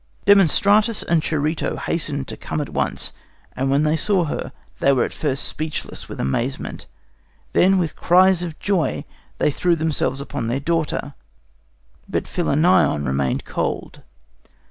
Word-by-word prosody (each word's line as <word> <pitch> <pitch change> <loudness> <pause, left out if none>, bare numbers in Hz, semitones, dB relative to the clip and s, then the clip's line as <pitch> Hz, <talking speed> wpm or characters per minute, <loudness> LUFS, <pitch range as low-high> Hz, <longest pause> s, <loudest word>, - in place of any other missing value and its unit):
"Demostratus 205 +3 +4
and 165 -1 +3
Charito 155 +1 -1
hastened 145 -5 -2
to - - -5
come - - -4
at 145 - -3
once, - - -1 0.4
and 135 +1 -1
when 140 +2 +3
they 155 +1 +2
saw 190 +3 +2
her, 155 - -4 0.3
they 140 - +4
were 130 -3 +3
at - - -4
first 140 -3 -1
speechless 155 0 -4
with - - -8
amazement. 120 - -3 0.7
Then, 190 +2 +4
with 170 -4 -1
cries 185 0 +4
of 165 -3 -4
joy, 170 - -1 0.3
they - - +2
threw 175 +4 +1
themselves 155 -4 -1
upon 140 -4 -4
their 120 +4 -1
daughter. 155 -1 -1 1.0
But - - -2
Philinnion 165 - +2
remained 65 0 -1
cold. - - -3
155 Hz, 145 wpm, -21 LUFS, 140-175 Hz, 1.0 s, Demostratus